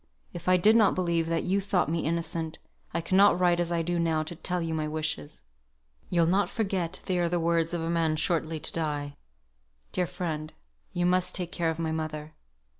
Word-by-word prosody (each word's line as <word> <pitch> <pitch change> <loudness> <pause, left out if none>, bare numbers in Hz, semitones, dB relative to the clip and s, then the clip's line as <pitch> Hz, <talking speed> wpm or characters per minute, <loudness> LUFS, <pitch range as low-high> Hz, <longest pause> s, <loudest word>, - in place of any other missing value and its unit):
If 175 +1 -4
I 185 - +6
did 210 +5 +5
not 215 -4 +5
believe 170 -2 0
that 165 0 0
you 195 +2 +1
thought 190 -4 +1
me 165 +2 0
innocent, 165 0 -2 0.3
I 170 - -1
could 185 +3 +1
not 200 -2 +6
write 175 -1 +3
as 175 0 0
I 170 -1 +1
do 175 +1 -1
now 160 -2 +1
to 165 +2 -7
tell 180 +2 -1
you 165 -1 -2
my 155 -1 -1
wishes. 150 - -4 0.7
You'll 170 -2 +3
not 190 +4 +2
forget 190 -6 -2
they 180 -1 0
are 170 -1 +1
the 175 0 0
wishes 165 0 +1
of 170 - -2
a 165 - -2
man 165 -2 +1
shortly 160 0 0
to - - -3
die. 145 -3 -2 0.8
Dear 180 -1 0
friend, 155 -4 -4 0.4
you 175 0 0
must 180 0 +2
take 175 -2 -2
care 170 -4 0
of 160 - -2
my 165 -1 -2
mother. 155 -1 -4
170 Hz, 210 wpm, -28 LUFS, 160-180 Hz, 0.8 s, I